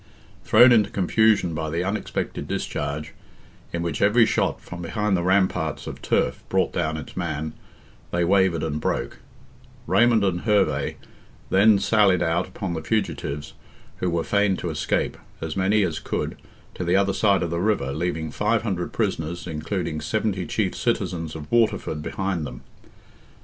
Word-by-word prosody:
Thrown 125 Hz, +1 st, +7 dB
into 110 Hz, -4 st, +4 dB
confusion 100 Hz, -1 st, +2 dB
by 80 Hz, 0 st, -3 dB
the 85 Hz, +3 st, -1 dB
unexpected 100 Hz, +3 st, -3 dB
discharge, 75 Hz, +2 st, -3 dB, 0.6 s
in 85 Hz, 0 st, -2 dB
which 85 Hz, -3 st, -3 dB
every 110 Hz, +3 st, +5 dB
shot -, -, 0 dB
from 85 Hz, 0 st, -9 dB
behind 105 Hz, +3 st, 0 dB
the 90 Hz, -, 0 dB
ramparts 90 Hz, -5 st, +1 dB
of -, -, -7 dB
turf -, -, 0 dB
brought -, -, +1 dB
down 80 Hz, 0 st, -1 dB
its 75 Hz, -, -9 dB
man, 75 Hz, +2 st, -3 dB, 0.6 s
they 85 Hz, 0 st, +1 dB
wavered 95 Hz, -3 st, +3 dB
and 75 Hz, -1 st, -2 dB
broke; -, -, -2 dB, 0.7 s
Raymond 110 Hz, +4 st, +4 dB
and 90 Hz, -3 st, 0 dB
Herve 105 Hz, -3 st, +1 dB, 0.6 s
then 105 Hz, +2 st, +6 dB
sallied 100 Hz, -4 st, +3 dB
out 80 Hz, 0 st, 0 dB
upon 95 Hz, -3 st, -4 dB
the 80 Hz, -, -3 dB
fugitives, 75 Hz, -7 st, -2 dB, 0.4 s
who 90 Hz, -, -1 dB
were 85 Hz, -1 st, 0 dB
fain 100 Hz, -2 st, +2 dB
to 85 Hz, -, -3 dB
escape, 75 Hz, -, -1 dB, 0.2 s
as 80 Hz, -1 st, -4 dB
many 100 Hz, +3 st, +2 dB
as 85 Hz, -4 st, -1 dB
could, -, -, -3 dB, 0.4 s
to -, -, -4 dB
the 85 Hz, +1 st, +2 dB
other 100 Hz, 0 st, +3 dB
side 100 Hz, -2 st, +3 dB
of 85 Hz, -, -3 dB
the 85 Hz, 0 st, -1 dB
river, 105 Hz, -9 st, 0 dB
leaving 80 Hz, 0 st, -2 dB
500 105 Hz, -4 st, -1 dB
prisoners, 80 Hz, +2 st, -2 dB
including 80 Hz, 0 st, -3 dB
70 95 Hz, +1 st, -1 dB
chief 100 Hz, -5 st, 0 dB
citizens 90 Hz, -9 st, -2 dB
of 75 Hz, -2 st, -8 dB
Waterford 110 Hz, -9 st, +1 dB
behind 95 Hz, +1 st, -2 dB
them. -, -, -9 dB
90 Hz, 155 wpm, -24 LUFS, 80-105 Hz, 0.7 s, Thrown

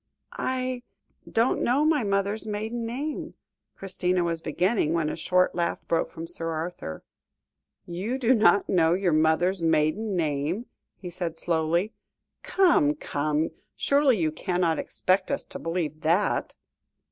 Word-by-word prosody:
"I 255 Hz, -1 st, -1 dB, 0.5 s
don't 230 Hz, +2 st, +2 dB
know 270 Hz, +5 st, +2 dB
my 310 Hz, -5 st, +3 dB
mother's 200 Hz, +2 st, 0 dB
maiden 220 Hz, +3 st, -3 dB
name 285 Hz, +6 st, -4 dB, 0.2 s
" -, -, -58 dB
Christina 180 Hz, -2 st, 0 dB
was 165 Hz, -1 st, -1 dB
beginning, 170 Hz, +1 st, +1 dB
when 165 Hz, -2 st, +1 dB
a -, -, -3 dB
short 180 Hz, +2 st, +2 dB
laugh 170 Hz, -1 st, -2 dB
broke 165 Hz, -, +1 dB
from 165 Hz, 0 st, -7 dB
Sir 165 Hz, -1 st, -5 dB
Arthur. 160 Hz, -, -5 dB, 0.8 s
"You 195 Hz, +9 st, -3 dB
do 260 Hz, -1 st, +3 dB
not 205 Hz, -5 st, +4 dB
know 170 Hz, -2 st, +3 dB
your 185 Hz, -3 st, +1 dB
mother's 160 Hz, +4 st, +2 dB
maiden 165 Hz, +6 st, +1 dB
name?" 160 Hz, +6 st, -1 dB, 0.3 s
he 180 Hz, -2 st, -8 dB
said 170 Hz, -2 st, -4 dB
slowly; 170 Hz, +5 st, 0 dB, 0.5 s
"come, 330 Hz, -6 st, +3 dB
come, 150 Hz, -, -1 dB, 0.2 s
surely 280 Hz, -4 st, +3 dB
you 160 Hz, -4 st, +1 dB
cannot 175 Hz, -1 st, 0 dB
expect 185 Hz, 0 st, 0 dB
us -, -, -1 dB
to -, -, -9 dB
believe 165 Hz, -2 st, -3 dB
that." 170 Hz, +6 st, +1 dB
180 Hz, 140 wpm, -26 LUFS, 165-220 Hz, 0.8 s, not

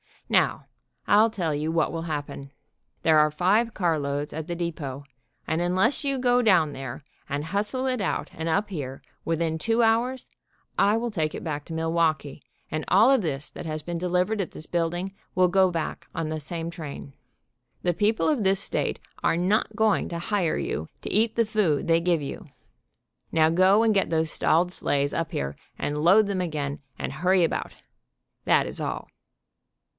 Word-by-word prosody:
Now, -, -, +2 dB, 0.4 s
I'll 215 Hz, +2 st, +5 dB
tell 175 Hz, -8 st, -2 dB
you 150 Hz, +2 st, -1 dB
what 165 Hz, -1 st, +1 dB
will 165 Hz, -1 st, -4 dB
happen. 145 Hz, -3 st, -5 dB, 0.5 s
There 155 Hz, -1 st, +5 dB
are 150 Hz, 0 st, +5 dB
five 200 Hz, +9 st, +2 dB
carloads 145 Hz, -5 st, -1 dB
at 160 Hz, 0 st, -5 dB
the 175 Hz, -, -3 dB
depot, 155 Hz, -6 st, -4 dB, 0.4 s
and 160 Hz, +2 st, -1 dB
unless 185 Hz, -, +1 dB
you 275 Hz, -1 st, +1 dB
go 250 Hz, -1 st, +3 dB
down 185 Hz, -9 st, +4 dB
there 135 Hz, -1 st, -7 dB, 0.3 s
and 145 Hz, +1 st, -2 dB
hustle 205 Hz, -, -2 dB
it 255 Hz, -2 st, 0 dB
out 195 Hz, -, -2 dB
and 160 Hz, +1 st, -4 dB
up 205 Hz, +6 st, +1 dB
here, 135 Hz, -8 st, -6 dB, 0.2 s
within 165 Hz, -1 st, -1 dB
two 225 Hz, +7 st, +2 dB
hours, 235 Hz, +3 st, +1 dB, 0.5 s
I 205 Hz, +2 st, +4 dB
will 235 Hz, 0 st, -2 dB
take 155 Hz, -6 st, -1 dB
it -, -, -6 dB
back 150 Hz, -4 st, -4 dB
to 165 Hz, -, -8 dB
Milwaukee, 160 Hz, -3 st, 0 dB, 0.3 s
and 155 Hz, 0 st, -2 dB
all 220 Hz, +8 st, +6 dB
of 270 Hz, -4 st, +4 dB
this 145 Hz, -5 st, -3 dB
that -, -, -8 dB
has 155 Hz, -1 st, -3 dB
been 175 Hz, -1 st, -4 dB
delivered 180 Hz, +4 st, 0 dB
at 180 Hz, -, -4 dB
this 155 Hz, -, -9 dB
building 175 Hz, +3 st, -2 dB, 0.2 s
will 180 Hz, 0 st, +4 dB
go 190 Hz, 0 st, +4 dB
back 165 Hz, -2 st, -4 dB
on 160 Hz, -1 st, -2 dB
the 155 Hz, 0 st, -3 dB
same 165 Hz, +2 st, -5 dB
train. 145 Hz, -4 st, -8 dB, 0.7 s
The 175 Hz, -, +2 dB
people 210 Hz, -, +1 dB
of 280 Hz, -8 st, +1 dB
this 195 Hz, 0 st, +3 dB
state -, -, -2 dB, 0.2 s
are -, -, +2 dB
not 205 Hz, +4 st, +1 dB
going 220 Hz, -1 st, +2 dB
to 170 Hz, -, -4 dB
hire 175 Hz, -1 st, 0 dB
you 80 Hz, -, -3 dB
to -, -, -5 dB
eat 220 Hz, +2 st, +2 dB
the 230 Hz, -, +3 dB
food 210 Hz, -9 st, +1 dB
they 165 Hz, 0 st, +4 dB
give 170 Hz, -2 st, +1 dB
you. 140 Hz, -, -6 dB, 0.9 s
Now 160 Hz, -1 st, +4 dB
go 185 Hz, +6 st, +5 dB
and 225 Hz, -1 st, +4 dB
get 195 Hz, -, +1 dB
those 160 Hz, -1 st, +1 dB
stalled 175 Hz, +3 st, +2 dB
sleighs 145 Hz, -4 st, 0 dB
up 165 Hz, -1 st, -2 dB
here, 70 Hz, +1 st, -3 dB, 0.2 s
and 150 Hz, +1 st, -2 dB
load 200 Hz, +6 st, +6 dB
them 200 Hz, -2 st, -1 dB
again, 150 Hz, -5 st, -3 dB, 0.2 s
and -, -, -4 dB
hurry 180 Hz, +4 st, +3 dB
about. 165 Hz, -, -1 dB, 0.7 s
That -, -, +4 dB
is -, -, -5 dB
all." -, -, -4 dB
170 Hz, 185 wpm, -26 LUFS, 155-205 Hz, 0.9 s, all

